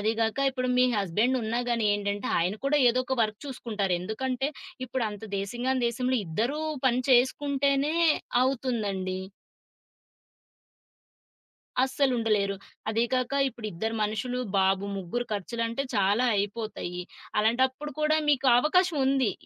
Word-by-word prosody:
అదిగాక 225 +3 0
ఇప్పుడు 255 -1 -2
మీ 250 - +6
హస్బెండున్నా 225 +5 0
గానీ 230 -3 +1
ఏంటంటే, 205 0 -3
ఆయన 180 +4 +1
కూడా 290 +1 +3
ఏదో 255 +2 0
ఒక 265 - -1
వర్క్ 215 -1 -2
చూసుకుంటారు. 215 -8 -2
ఎందుకంటే, 255 +7 -2 0.4
ఇప్పుడు 245 -1 -2
అంత 210 +1 -8
దేశంగాని 240 +5 -1
దేశంలో 250 +1 0
ఇద్దరూ 235 - -1 0.3
పని 255 0 +2
చేసుకుంటేనే 280 +3 +2 0.5
అవుతుందండి. 210 -8 -1 2.6
అస్సలుండలేరు. 230 -7 +1 0.3
అదీ 225 +2 +1
కాక 255 +1 0 0.2
ఇప్పుడిద్దరు 220 -1 -4
మనుషులు, 220 +4 -2 0.2
బాబు 190 +1 +2
ముగ్గురు 195 +7 -3
ఖర్చులంటే, 230 +5 -2
చాలా 205 +5 +3
అయిపోతాయి. 200 -3 -3 0.4
అలాంటప్పుడు 260 +6 +1
కూడా 310 +1 +3
మీకు 275 -2 +2
అవకాశం 350 +2 +2
ఉంది. 265 -6 +2
235 Hz, 110 wpm, -27 LUFS, 205-260 Hz, 2.6 s, మీ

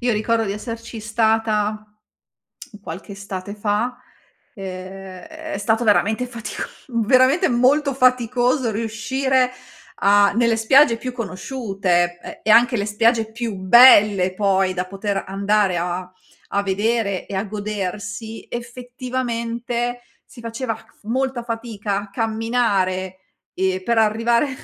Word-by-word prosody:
Io 245 -1 +1
ricordo 225 +1 +1
di 195 - -2
esserci 230 +2 -7
stata 215 -1 0 1.0
qualche 190 +2 -8
estate 195 0 -7
fa. 220 +4 -1 0.6
Ehm, 190 -1 -8
è 315 -7 -7
stato 220 +3 +1
veramente 220 +3 +2
fatico 230 -4 -6 0.4
veramente 265 - +4
molto 275 +4 +3
faticoso 250 0 +2
riuscire 250 +4 0 0.5
a 200 0 +5
nelle 235 -1 +3
spiagge 235 +2 +5
più 255 +2 -5
conosciute 195 -6 -1
e - - -10
e 220 - +1
anche 240 +3 +6
le 200 - -1
spiagge 225 +1 +2
più 230 -2 -4
belle 200 -2 +6
poi 195 -2 +1
da 180 0 -2
poter 195 +1 -3
andare 200 -1 +1
a 180 +1 -3 0.4
a 200 - +1
vedere 200 0 -1
e 200 - -7
a 195 - -1
godersi, 205 +1 -5
effettivamente 240 0 -4 0.2
si - - -15
faceva 230 0 -4
c - - -18
f - - -31
molta 255 +2 -1
fatica 225 -4 -4
a 200 - -12
camminare 210 -4 0 0.4
e 185 0 -1
per 235 -1 +1
arrivare 230 +5 +2
220 Hz, 125 wpm, -21 LUFS, 200-240 Hz, 1.0 s, anche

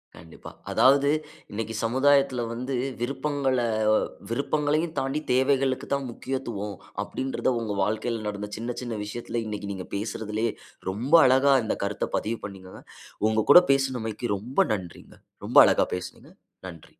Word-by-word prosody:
கண்டிப்பா. 80 -1 -12 0.2
அதாவது 140 +2 +5 0.4
இன்னைக்கு 110 +1 -4
சமுதாயத்துல 130 +1 +3
வந்து 125 +3 -4 0.3
விருப்பங்கள 135 +1 -1 0.7
விருப்பங்களையும் 150 +5 0
தாண்டி 135 +3 -1
தேவைகளுக்கு 130 0 +1
தான் 140 -1 -1
முக்கியத்துவம் 115 -6 -4 0.3
அப்டின்றது 130 +5 -2
உங்க 110 -3 -3
வாழ்க்கையில 110 +2 -2
நடந்த 105 0 -4
சின்ன, 120 +2 -4
சின்ன 120 -2 -4
விஷயத்துல 120 +2 -4
இன்னைக்கு 105 -1 -5
நீங்க 95 -1 -7
பேசுறதுலயே 110 +2 -2 0.4
ரொம்ப 120 - -4
அழகா 135 +2 +5
இந்த - - -1
கருத்த 100 +1 -2
பதிவு 115 +1 -3
பண்ணீங்கங்க. 95 -2 -10 0.5
உங்க 110 -1 0
கூட 175 - +11
பேசினமைக்கு 125 -4 -1
ரொம்ப 120 +7 -4
நன்றிங்க. 90 -5 -7 0.3
ரொம்ப - - 0
அழகா - - +3
பேசினீங்க. 90 - -9 0.4
நன்றி. 85 -3 -12
120 Hz, 125 wpm, -26 LUFS, 105-135 Hz, 0.7 s, கூட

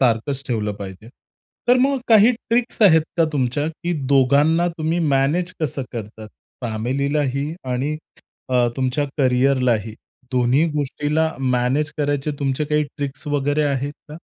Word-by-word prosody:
सारखंच 130 +2 +1
ठेवलं 105 -4 -1
पाहिजे. 100 +1 -9 0.6
तर 245 - +6
मग 270 +2 +2
काही 220 0 +7
ट्रिक्स 235 0 -1
आहेत 160 -6 +7
का 165 - +4
तुमच्या, 140 +1 0
की 170 +2 -4 0.2
दोघांना 145 +6 +4
तुम्ही 160 +2 0 0.2
मॅनेज 160 +7 +1
कसं 145 -3 -2
करतात? 110 -1 -7 0.3
फॅमिलीलाही 140 +5 -1 0.2
आणि 140 +5 -1 0.5
अ, 125 -2 +3
तुमच्या 130 +2 0
करियरलाही? 125 -4 +2 0.4
दोन्ही 125 +4 +3
गोष्टीला 150 +2 -1
मॅनेज 130 +3 0
करायच्या 145 0 0
तुमच्या 140 +1 -1
काही 150 0 +1
ट्रिक्स 140 0 -5
वगैरे 145 +1 +1
आहेत 140 0 -1 0.2
का? 150 - -8
140 Hz, 130 wpm, -21 LUFS, 125-155 Hz, 0.6 s, काही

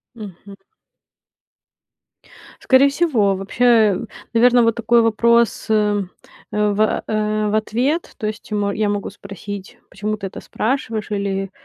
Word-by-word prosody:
Мгм. 200 -2 -11 2.0
Скорее 265 +1 +5
всего. 275 - +1
Вообще, 215 0 +3 0.3
наверно, 245 +1 +5
вот 230 -1 +2
такой 235 0 +3
вопрос, 235 +1 +2
э 210 -1 +2 0.5
э, 210 0 +1
в, 215 +2 +1
э 215 0 -1
в - - -2
ответ. 245 +9 -1
То 220 - -3
есть 215 +1 -6
я 210 - -1
м 200 -1 0
я 210 +1 -1
могу 205 -1 -3
спросить, 200 0 -9
почему 210 +2 -4
ты 200 - -6
это 190 - -8
спрашиваешь, 225 -3 -3
или, 195 -1 -2
215 Hz, 135 wpm, -19 LUFS, 205-235 Hz, 2.0 s, Скорее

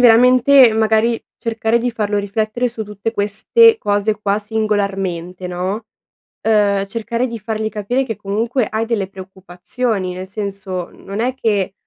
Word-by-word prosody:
veramente, 250 +1 +6
magari, 220 +1 +2 0.2
cercare 225 0 0
di 245 +1 -1
farlo 210 -2 -1
riflettere 215 +4 -1
su 230 -1 -6
tutte 210 +2 -4
queste 230 - +4
cose 205 +1 0
qua 205 0 0
singolarmente, 195 -5 -2
no? 185 +5 -3 0.6
Uhm, 200 -2 +3
cercare 235 +3 -2
di 230 -1 -5
fargli 220 +1 -3
capire 220 +5 -1
che 225 - -4
comunque 220 +4 -1
hai 220 +1 -1
delle 205 -5 -1
preoccupazioni, 190 +2 -4
nel 185 +1 -7
senso, 195 -3 -4
mhmm, - - -18
non 200 +2 -5
è 250 +3 0
che 205 -5 0
215 Hz, 145 wpm, -18 LUFS, 195-230 Hz, 0.6 s, veramente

